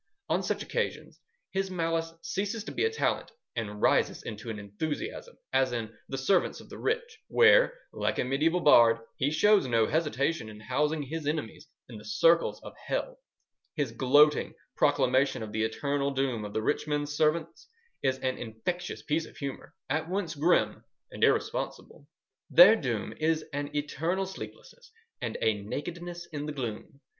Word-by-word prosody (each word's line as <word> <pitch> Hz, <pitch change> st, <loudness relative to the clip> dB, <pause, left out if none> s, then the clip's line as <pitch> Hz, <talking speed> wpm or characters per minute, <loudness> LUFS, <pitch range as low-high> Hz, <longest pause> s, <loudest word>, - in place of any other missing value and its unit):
On -, -, +2 dB
such -, -, -2 dB
occasions 475 Hz, -, -3 dB, 0.3 s
his 195 Hz, 0 st, -1 dB
malice 165 Hz, -2 st, -1 dB
ceases 205 Hz, +3 st, -2 dB
to -, -, -7 dB
be -, -, 0 dB
a -, -, +3 dB
talent, 450 Hz, -, -1 dB, 0.2 s
and 105 Hz, -3 st, -4 dB
rises -, -, +2 dB
into 110 Hz, +1 st, -7 dB
an 110 Hz, -, -4 dB
enthusiasm, 155 Hz, -, -5 dB, 0.2 s
as 130 Hz, -, +3 dB
in 115 Hz, -2 st, -4 dB
The 135 Hz, -, -3 dB
Servants 175 Hz, +8 st, +1 dB
of -, -, -14 dB
the -, -, -9 dB
Rich, 460 Hz, 0 st, -2 dB
where, -, -, +5 dB, 0.2 s
like -, -, -1 dB
a -, -, +1 dB
mediaeval 155 Hz, +7 st, +1 dB
bard, 115 Hz, -6 st, +7 dB, 0.2 s
he 135 Hz, -, +1 dB
shows 195 Hz, +1 st, +4 dB
no 115 Hz, -2 st, +3 dB
hesitation 150 Hz, -4 st, 0 dB
in 105 Hz, 0 st, -11 dB
housing 150 Hz, +7 st, 0 dB
his 155 Hz, +2 st, -5 dB
enemies 150 Hz, -1 st, -3 dB, 0.2 s
in 115 Hz, -4 st, -9 dB
the -, -, -13 dB
circles 165 Hz, +11 st, +3 dB
of -, -, -9 dB
Hell. -, -, -2 dB, 0.6 s
His 145 Hz, -7 st, -1 dB
gloating 145 Hz, +5 st, +4 dB, 0.2 s
proclamation 130 Hz, -1 st, +2 dB
of 105 Hz, -, -7 dB
the 110 Hz, -, -1 dB
eternal 140 Hz, +5 st, -1 dB
doom 130 Hz, -5 st, -1 dB
of 105 Hz, -, -7 dB
the 110 Hz, -, -1 dB
rich -, -, 0 dB
men's 145 Hz, 0 st, -1 dB
servants 160 Hz, +1 st, 0 dB, 0.3 s
is 130 Hz, -1 st, +1 dB
an 130 Hz, 0 st, -1 dB
infectious 120 Hz, +11 st, -4 dB
piece 160 Hz, +2 st, -1 dB
of -, -, -16 dB
humour, 140 Hz, -2 st, -6 dB
at 155 Hz, +4 st, -1 dB
once 185 Hz, -3 st, -2 dB
grim 160 Hz, +4 st, +2 dB, 0.3 s
and -, -, -4 dB
irresponsible:— 145 Hz, -, 0 dB, 0.4 s
Their 185 Hz, +6 st, +9 dB
doom 120 Hz, -, -3 dB
is 160 Hz, 0 st, +1 dB
an 145 Hz, 0 st, -2 dB
eternal 165 Hz, +6 st, -1 dB
sleeplessness 465 Hz, -, -10 dB, 0.3 s
and -, -, -3 dB
a 110 Hz, -2 st, +2 dB
nakedness 170 Hz, -, -6 dB
in 145 Hz, 0 st, -4 dB
the 150 Hz, -, -4 dB
gloom.... 130 Hz, +1 st, -6 dB
150 Hz, 165 wpm, -29 LUFS, 125-170 Hz, 0.6 s, Their